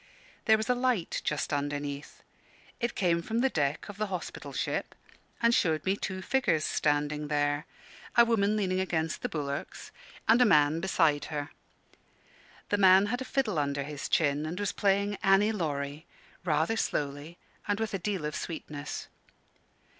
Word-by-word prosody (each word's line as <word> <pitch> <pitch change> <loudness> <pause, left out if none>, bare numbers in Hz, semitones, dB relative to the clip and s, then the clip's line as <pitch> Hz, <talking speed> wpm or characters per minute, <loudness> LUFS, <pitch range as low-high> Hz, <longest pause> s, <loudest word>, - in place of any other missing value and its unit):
There 220 -1 +6
was 220 - -3
a 250 - +4
light 245 -7 0
just 150 0 -1
underneath. 145 0 -4 0.6
It 235 -1 -1
came 170 -3 +2
from 225 +6 -1
the 265 0 +2
deck 145 -2 -1
of 205 -2 -9
the 215 0 -1
hospital 185 -3 -6
ship, - - -2 0.5
and 235 0 +5
showed 160 -8 +2
me 190 +1 +2
two 190 -2 -4
figures 245 - +1
standing 150 0 0
there 145 0 0 0.5
a 235 - +8
woman 215 -2 +2
leaning 185 -3 0
against 165 -4 -1
the - - -2
bulwarks, 140 -2 -5 0.4
and 225 +3 +6
a - - +9
man 150 -6 +4
beside 165 -5 +2
her. 145 -1 -4 1.2
The 205 - +2
man 190 0 +7
had 245 - -2
a - - -3
fiddle 220 - 0
under 140 -1 -1
his 145 0 -6
chin, 145 -2 +2
and 175 +4 -4
was 205 -1 0
playing 200 0 +1
"Annie 195 +2 +4
Laurie," 150 -5 -3 0.4
rather 160 +6 +1
slowly 145 -1 -2 0.3
and 205 0 0
with 225 -2 -2
a 195 - -1
deal 190 -4 -2
of 150 - -3
sweetness. 150 -3 -5
170 Hz, 160 wpm, -29 LUFS, 150-205 Hz, 1.2 s, a